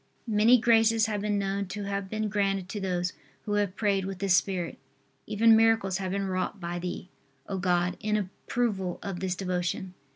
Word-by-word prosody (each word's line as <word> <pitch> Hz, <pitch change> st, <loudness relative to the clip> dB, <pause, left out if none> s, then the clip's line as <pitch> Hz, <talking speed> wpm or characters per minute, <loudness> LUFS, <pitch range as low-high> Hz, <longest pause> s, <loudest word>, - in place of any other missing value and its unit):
Many 225 Hz, +2 st, +5 dB
graces 225 Hz, -1 st, +4 dB
have 210 Hz, -2 st, -2 dB
been 210 Hz, 0 st, 0 dB
known 200 Hz, 0 st, -1 dB
to 205 Hz, +2 st, -5 dB
have 200 Hz, -1 st, -3 dB
been 215 Hz, +1 st, -1 dB
granted 195 Hz, -2 st, 0 dB
to 210 Hz, -, -4 dB
those 180 Hz, -2 st, -1 dB, 0.3 s
who 205 Hz, -, -2 dB
have 205 Hz, -2 st, 0 dB
prayed 200 Hz, -3 st, +1 dB
with 195 Hz, 0 st, -5 dB
this 195 Hz, -1 st, +3 dB
spirit. 180 Hz, -6 st, -1 dB, 0.5 s
Even 225 Hz, +2 st, +5 dB
miracles 220 Hz, -4 st, +3 dB
have 190 Hz, -1 st, -3 dB
been 195 Hz, 0 st, -1 dB
wrought 185 Hz, +1 st, -2 dB
by 175 Hz, 0 st, -4 dB
Thee, 180 Hz, +1 st, -5 dB, 0.4 s
O 195 Hz, -1 st, -3 dB
God, 180 Hz, 0 st, +1 dB
in 215 Hz, 0 st, 0 dB
approval 195 Hz, -1 st, -2 dB
of 195 Hz, -3 st, -4 dB
this 185 Hz, -1 st, -1 dB
devotion. 180 Hz, 0 st, -2 dB
195 Hz, 185 wpm, -28 LUFS, 185-210 Hz, 0.5 s, Many